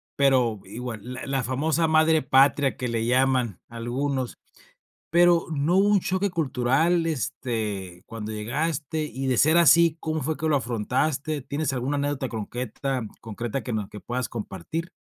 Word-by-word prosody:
pero 130 Hz, -6 st, +3 dB
igual, 115 Hz, +2 st, -6 dB
la 125 Hz, +1 st, -7 dB
la 135 Hz, -2 st, 0 dB
famosa 155 Hz, +6 st, +1 dB
madre 160 Hz, 0 st, +4 dB
patria, 135 Hz, +1 st, +3 dB
que 125 Hz, -, -2 dB
le 115 Hz, -1 st, -1 dB
llaman 125 Hz, -4 st, +2 dB
algunos, 125 Hz, +3 st, -2 dB, 0.7 s
pero, 175 Hz, 0 st, +4 dB
¿no 150 Hz, +5 st, +1 dB
hubo 200 Hz, +1 st, +4 dB
un 205 Hz, -2 st, +4 dB
choque 190 Hz, +2 st, 0 dB
cultural, 160 Hz, +3 st, +1 dB
este, 110 Hz, -, -3 dB
cuando 110 Hz, -1 st, -6 dB
llegaste?, 150 Hz, +7 st, -2 dB
y 135 Hz, -2 st, -4 dB
de 125 Hz, -3 st, +1 dB
ser 160 Hz, +3 st, +5 dB
así, 170 Hz, 0 st, +6 dB
¿cómo 155 Hz, -1 st, -2 dB
fue 155 Hz, +3 st, -1 dB
que 160 Hz, -, -1 dB
lo 150 Hz, -, +3 dB
afrontaste?, 135 Hz, +5 st, -1 dB
¿tienes 145 Hz, +2 st, -2 dB
alguna 130 Hz, +3 st, -1 dB
anécdota 140 Hz, -2 st, -1 dB
concreta- 125 Hz, +4 st, -3 dB, 0.2 s
concreta 115 Hz, +4 st, -4 dB
que 125 Hz, -, -4 dB
no 105 Hz, -3 st, -2 dB
que 105 Hz, -, -9 dB
puedas 125 Hz, +1 st, -3 dB
compartir? 115 Hz, -, -5 dB
135 Hz, 155 wpm, -25 LUFS, 120-155 Hz, 0.7 s, así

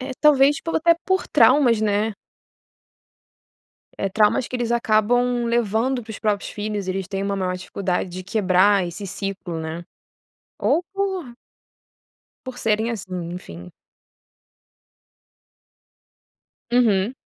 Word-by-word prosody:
Eh, 260 Hz, +1 st, -5 dB
talvez 290 Hz, -1 st, +5 dB
por 330 Hz, -, -2 dB
até 335 Hz, +1 st, +4 dB
por 375 Hz, 0 st, +1 dB
traumas, 240 Hz, -7 st, +4 dB
né. 210 Hz, +1 st, +1 dB, 1.9 s
Eh, 195 Hz, -, -1 dB
traumas 210 Hz, +4 st, +2 dB
que 250 Hz, -, -3 dB
eles 235 Hz, -1 st, -1 dB
acabam 240 Hz, +2 st, +2 dB
levando 235 Hz, +2 st, 0 dB
para 220 Hz, -, -12 dB
os 215 Hz, -, -7 dB
próprios 210 Hz, -2 st, -1 dB
filhos, 210 Hz, -2 st, -4 dB
eles 190 Hz, -1 st, -2 dB
têm 195 Hz, -1 st, -4 dB
uma 200 Hz, 0 st, -1 dB
maior 185 Hz, -1 st, -1 dB
dificuldade 185 Hz, 0 st, -3 dB
de 180 Hz, +1 st, -7 dB
quebrar 190 Hz, -1 st, +3 dB
esse 185 Hz, +4 st, -6 dB
ciclo, 195 Hz, -3 st, -5 dB
né. 160 Hz, +2 st, -6 dB, 0.7 s
Ou 345 Hz, -, +2 dB
por 380 Hz, -10 st, -3 dB, 1.1 s
por 255 Hz, -1 st, -7 dB
serem 220 Hz, +1 st, 0 dB
assim, 195 Hz, -5 st, -6 dB, 0.2 s
enfim. 90 Hz, -, -9 dB, 3.0 s
Uhum. 230 Hz, -2 st, +2 dB
215 Hz, 120 wpm, -22 LUFS, 195-245 Hz, 3.0 s, talvez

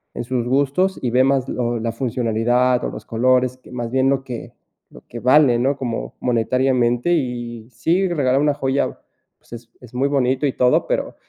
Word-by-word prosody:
en -, -, -3 dB
sus 120 Hz, -1 st, -2 dB
gustos, 140 Hz, +9 st, +1 dB
y 125 Hz, -3 st, -1 dB
ve 130 Hz, +1 st, +4 dB
más 135 Hz, -1 st, +1 dB
lo 120 Hz, -1 st, -2 dB
la 115 Hz, +1 st, -2 dB
funcionalidad 120 Hz, +1 st, 0 dB
o -, -, -2 dB
los -, -, -9 dB
colores 125 Hz, +2 st, +1 dB
que 130 Hz, -, -18 dB
más 120 Hz, -2 st, -5 dB
bien 130 Hz, +1 st, +2 dB
lo 135 Hz, -1 st, 0 dB
que 125 Hz, -3 st, -8 dB, 0.4 s
lo -, -, -14 dB
que 120 Hz, -, -8 dB
vale, 130 Hz, -1 st, +4 dB
¿no?, 135 Hz, +3 st, +1 dB
como 120 Hz, -4 st, -4 dB
monetariamente 125 Hz, +3 st, +1 dB
y 120 Hz, -6 st, -3 dB
si 170 Hz, -, +1 dB
regalar 135 Hz, -5 st, +1 dB
una 150 Hz, 0 st, +2 dB
joya, 140 Hz, -1 st, -1 dB, 0.4 s
pues, -, -, -17 dB
es 120 Hz, 0 st, -10 dB
es 125 Hz, -1 st, -15 dB
muy 135 Hz, +3 st, +1 dB
bonito 130 Hz, 0 st, +1 dB
y 130 Hz, -, -2 dB
todo, 125 Hz, 0 st, +2 dB
pero -, -, -2 dB
125 Hz, 190 wpm, -20 LUFS, 120-135 Hz, 0.4 s, ve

